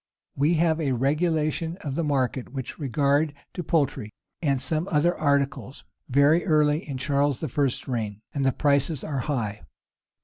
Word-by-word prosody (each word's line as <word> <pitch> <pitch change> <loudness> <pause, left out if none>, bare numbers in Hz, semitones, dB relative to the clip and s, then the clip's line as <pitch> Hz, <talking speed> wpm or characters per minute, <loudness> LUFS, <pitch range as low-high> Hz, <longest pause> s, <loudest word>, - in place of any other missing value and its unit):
We 150 +5 +2
have 165 0 +2
a 140 -4 +1
regulation 155 +4 0
of 140 -3 -4
the 170 - -1
market 135 -4 -1
with 130 +2 -6
regard 145 +2 +1 0.2
to - - -4
poultry, 140 -9 0 0.3
and 140 -5 +1
some 155 +6 -1
other 170 +3 +2
articles, 140 -2 -1 0.3
very 145 +6 +4
early 150 -3 +2
in 135 - -3
Charles 140 +1 0
I.'s 140 -2 -1
reign; 110 -5 -3
[] - - -46
and 140 - -1
the 135 - +3
prices 140 +1 +1
are 140 -3 -3
high. 115 -7 -2
145 Hz, 160 wpm, -25 LUFS, 135-155 Hz, 0.3 s, very